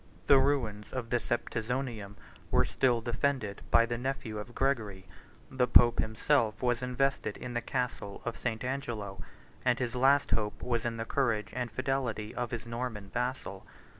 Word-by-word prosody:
The 140 - +7
ruins 120 -7 0
of 120 -3 -4
the 120 - +3
Septizonium 115 -3 -2 0.3
were - - +4
still 120 -3 +2
defended 120 -3 -1
by 115 0 +6
the 120 0 -3
nephew 125 -4 -3
of 120 +3 -8
Gregory: 110 -8 0 0.5
the 130 -1 +2
pope 120 -1 +6
himself 110 +1 +1
was 120 -1 +2
invested 125 -3 0
in 125 - -6
the 120 - 0
castle 125 -6 -3
of 120 -1 -2
St. 110 -1 -3
Angelo; 115 -8 -3 0.4
and 125 -2 +3
his 125 -1 -2
last 135 +3 +4
hope 105 -1 0
was 120 -2 0
in 115 -1 -1
the 115 - -3
courage 115 -6 0
and 125 -1 -2
fidelity 125 -3 -2
of 120 -1 -2
his 115 -1 -5
Norman 115 -4 -4
vassal. 125 -5 -2
120 Hz, 165 wpm, -31 LUFS, 110-130 Hz, 0.5 s, The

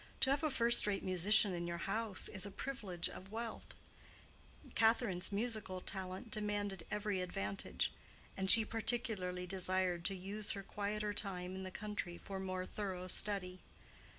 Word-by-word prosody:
To 265 - +3
have 280 - +1
a 310 - +2
first 235 -4 +5
rate 200 -1 -1
musician 190 +2 +4
in 170 0 -3
your 170 0 -3
house 215 0 0
is 190 - -1
a 200 - -2
privilege 200 -6 -4
of 190 +2 -10
wealth; 230 0 -6 1.0
Catherine's 220 -5 +2
musical 210 -3 -3
talent 190 +3 -6
demanded 205 -4 -3
every 210 -2 -2
advantage; 100 - -3 0.4
and 190 0 -2
she 225 +1 +13
particularly 215 -6 -1
desired 185 -1 0
to 195 - -1
use 200 +3 -2
her 200 -1 -6
quieter 210 +1 -3
time 185 -3 -4
in 190 - -6
the 190 - -6
country 200 -3 -5
for 195 -1 -7
more 185 -1 -4
thorough 185 -3 -5
study. 185 -1 0
195 Hz, 150 wpm, -36 LUFS, 185-215 Hz, 1.0 s, she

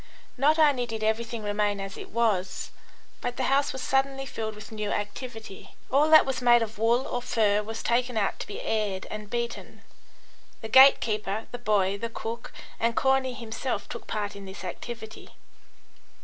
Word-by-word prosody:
Not 295 +5 +3
only 285 -6 +3
did 220 -1 -4
everything 225 +1 -1
remain 205 0 0
as 195 0 -6
it - - -9
was, 210 -5 0 0.5
but 245 0 -3
the 260 - -1
house 275 +2 +2
was 265 - -6
suddenly 270 -1 0
filled 220 -4 -5
with 210 0 -11
new 215 -2 -3
activity. 220 0 -6 0.2
All 290 +4 +4
that 315 0 +8
was 260 -2 -2
made 240 -1 +5
of 220 -1 -7
wool 235 +4 +2
or 245 - -2
fur 210 -4 +2
was 225 +1 -6
taken 245 0 +1
out 200 -2 0
to - - -5
be 205 - -6
aired 205 -4 -1
and 215 -1 -6
beaten. 235 0 -4 0.8
The 220 - -6
gate 265 +4 +8
keeper, 215 -1 -2
the 245 - -6
boy, 200 -4 +1
the 230 - -3
cook, 230 +1 -6 0.3
and 230 0 +1
Corney 265 -1 +2
himself 235 +1 -4
took 235 - -8
part 205 -1 -3
in 200 -1 -9
this 190 0 -9
activity. 220 +4 -8
225 Hz, 175 wpm, -27 LUFS, 210-250 Hz, 0.8 s, that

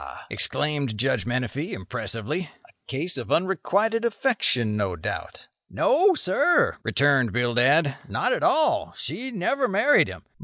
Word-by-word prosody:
exclaimed 145 -6 0
Judge 130 +2 0
Menefee, 130 +5 -3
impressively; 115 - -5 0.2
"a - - -24
case 155 +7 -3
of - - -7
unrequited 200 +5 +1
affection, 205 - +1
no 100 -4 -1
doubt." 80 - -6 0.2
"No, 375 +4 +3
sir," 285 - +2
returned 140 -5 +2
Bildad, 125 +5 +2
"not - - 0
at - - -2
all. 310 -1 +2
She 260 +2 -5
never 255 +5 -1
married 220 +9 +3
him. - - -10
150 Hz, 125 wpm, -24 LUFS, -, 0.2 s, No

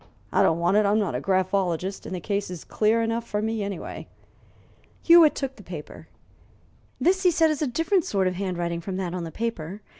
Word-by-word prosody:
I - - +4
don't 165 - +3
want 175 +4 +2
it; 215 - +4
I'm 205 +2 +3
not 205 -8 0
a 125 - -2
graphologist, 185 0 -1
and 185 - -4
the - - -4
case 200 +2 -2
is 180 -3 -7
clear 225 +2 +1
enough 230 +1 -1
for 210 -3 -3
me 220 0 -2
anyway." 200 -3 -6 1.0
Hewitt 335 -3 +7
took 270 -1 -4
the - - -12
paper. 170 -6 -9 0.9
"This" 380 +2 +2
he 370 - +5
said, 320 -2 +3
"is 305 - -3
a 300 - +1
different 330 - +1
sort 195 -2 0
of 185 - 0
handwriting 175 -3 -3
from 185 +2 -5
that 180 -2 -3
on 180 -2 -3
the 165 - -7
paper. 200 -3 -4
200 Hz, 210 wpm, -25 LUFS, 180-230 Hz, 1.0 s, Hewitt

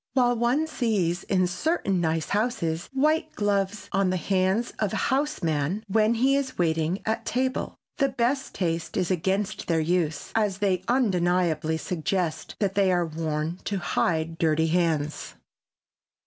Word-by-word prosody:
While 245 -2 +3
one 245 +7 +2
sees 205 - 0
in 185 -2 +2
certain 190 - 0
nice 160 -1 0
houses 200 -7 -1
white 305 +4 +1
gloves 200 0 0
on 195 -1 +2
the 185 - 0
hands 190 +6 0
of 210 -3 0
a - - 0
house 290 -4 -1
man 160 +6 0
when 215 +3 +3
he 265 +4 +3
is 275 -2 -2
waiting 165 +1 0
at 220 +1 -1
table, 260 +1 -1 0.2
the 275 -1 +3
best 260 +2 -1
taste 165 -3 -2
is 180 - 0
against 190 +4 -1
their 165 -2 +2
use, 160 -2 -1
as 210 -4 +1
they 195 -3 +1
undeniably 175 - +1
suggest 175 0 -2
that 195 -2 0
they 195 -1 +3
are 175 -1 +2
worn 160 +1 -3
to 200 - -1
hide 165 -2 -1
dirty 160 0 +2
hands. 160 -3 0
185 Hz, 150 wpm, -26 LUFS, 165-225 Hz, 0.2 s, While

